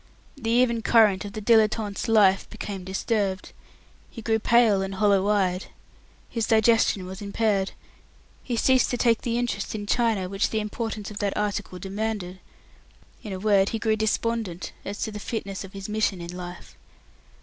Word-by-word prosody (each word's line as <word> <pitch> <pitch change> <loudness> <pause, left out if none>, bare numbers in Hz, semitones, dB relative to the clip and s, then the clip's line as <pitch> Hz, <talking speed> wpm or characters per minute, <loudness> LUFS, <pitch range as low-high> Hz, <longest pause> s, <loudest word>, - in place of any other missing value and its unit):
The 230 -5 -4
even 235 -1 +3
current 215 -4 +4
of 200 - -7
the 215 -1 -6
dilettante's 215 -2 +2
life 200 -4 +4
became 205 -3 -6
disturbed. 195 +1 -2 0.6
He 230 - -10
grew 220 0 +1
pale 225 -3 +4
and 195 0 -4
hollow 200 -1 +3
eyed. 190 -3 +1 0.6
His 230 -2 -2
digestion 220 -3 +3
was 190 +2 -8
impaired. 200 -1 0 0.7
He 240 -2 -3
ceased 260 +2 +3
to 245 - -1
take 230 -2 +2
the 235 -1 -1
interest 230 -4 -2
in 205 -1 -4
china 220 -4 +1
which 195 +2 0
the 220 - -1
importance 215 0 -4
of 205 - -7
that 200 -1 -1
article 205 -3 -2
demanded. 195 -1 -4 0.8
In 210 - -7
a 190 - -3
word, 200 0 +3
he 225 - -2
grew 220 0 +1
despondent 220 -4 -2
as 205 +1 -6
to 220 - -3
his 210 -1 -7
fitness 200 -5 -4
for 195 - -6
his 195 0 -8
mission 210 -3 0
in 170 +1 -7
life. 180 0 -9
210 Hz, 170 wpm, -25 LUFS, 195-225 Hz, 0.8 s, current